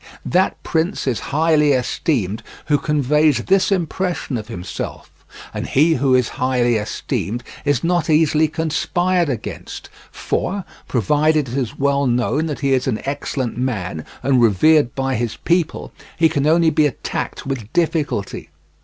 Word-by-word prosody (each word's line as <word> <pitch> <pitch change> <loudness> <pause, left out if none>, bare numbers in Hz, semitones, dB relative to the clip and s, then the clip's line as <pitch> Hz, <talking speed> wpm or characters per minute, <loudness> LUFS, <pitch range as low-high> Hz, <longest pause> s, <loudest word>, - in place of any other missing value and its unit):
That 185 +2 +1
prince 165 +4 -1
is 130 -4 0
highly 150 -1 +3
esteemed 120 - -1 0.2
who 145 -1 +2
conveys 150 +1 +2
this 195 +1 +2
impression 180 -4 -1
of 110 -2 -4
himself, 90 -5 -6 0.4
and - - -4
he 155 +5 +3
who 130 -2 +2
is 125 -2 +2
highly 125 -2 +2
esteemed 110 +2 -3 0.2
is 145 -4 +1
not 175 -1 +1
easily 155 0 +3
conspired 170 +2 0
against; 115 -7 -6 0.2
for, 195 0 -2 0.2
provided 150 +4 +2
it 120 - -5
is 130 -5 -2
well 140 0 +1
known 125 +6 +1
that 150 -3 -5
he 140 -1 +2
is 130 0 +1
an 115 -5 0
excellent 135 -4 -3
man 100 -11 -2 0.2
and 130 -3 +3
revered 120 - +4
by 135 0 -1
his 120 -1 -2
people, 170 -2 -1 0.3
he 165 - +5
can 145 0 0
only 165 0 +4
be 150 0 +3
attacked 140 - -5
with 125 -5 -4
difficulty. 155 - -1
140 Hz, 145 wpm, -20 LUFS, 125-160 Hz, 0.4 s, he